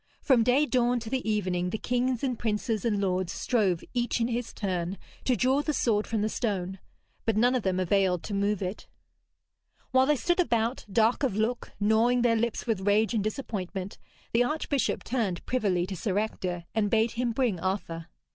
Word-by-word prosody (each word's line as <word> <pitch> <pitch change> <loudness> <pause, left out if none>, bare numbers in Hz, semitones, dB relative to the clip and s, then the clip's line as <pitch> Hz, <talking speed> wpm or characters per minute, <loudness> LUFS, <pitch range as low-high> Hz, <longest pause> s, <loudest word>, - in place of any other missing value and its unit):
From 260 -5 +4
day 250 +6 +4
dawn 245 -3 +2
to 225 0 -7
the 260 -4 -1
evening 185 -4 0
the 220 - -2
kings 250 +1 -1
and 250 -4 -1
princes 215 -1 -1
and 210 -3 +1
lords 185 -2 0
strove 195 -8 0
each 240 0 0
in 230 +1 +1
his 240 0 -2
turn 185 -2 -2 0.3
to 255 - +3
draw 260 +4 +2
the 305 +1 -1
sword 215 -3 +1
from 220 -2 -1
the - - +2
stone. 195 -5 -2 0.4
But 225 -2 0
none 245 +3 +4
of 255 - +1
them 185 -2 0
availed 185 -1 +2
to 205 - -5
move 200 0 0
it. 185 +3 -5 1.0
While 260 0 +4
they 300 - +4
stood 345 +8 0
about, 235 -6 +1
dark 225 +4 +3
of 260 -8 +1
look, 225 +3 -1
gnawing 225 +4 +3
their 235 -1 +4
lips 230 0 -1
with 210 -5 -1
rage 215 +3 +3
and 215 -3 +1
disappointment, 200 -5 -4 0.3
the 235 +1 +4
archbishop 290 0 -1
turned 220 -8 -2
privily 195 -8 +1
to 190 +1 -5
Sir 195 +1 -2
Ector 180 -5 -2
and 210 -1 +1
bade 225 +1 +2
him 240 0 -1
bring 230 -6 0
Arthur. 170 -3 -3
220 Hz, 190 wpm, -28 LUFS, 195-245 Hz, 1.0 s, From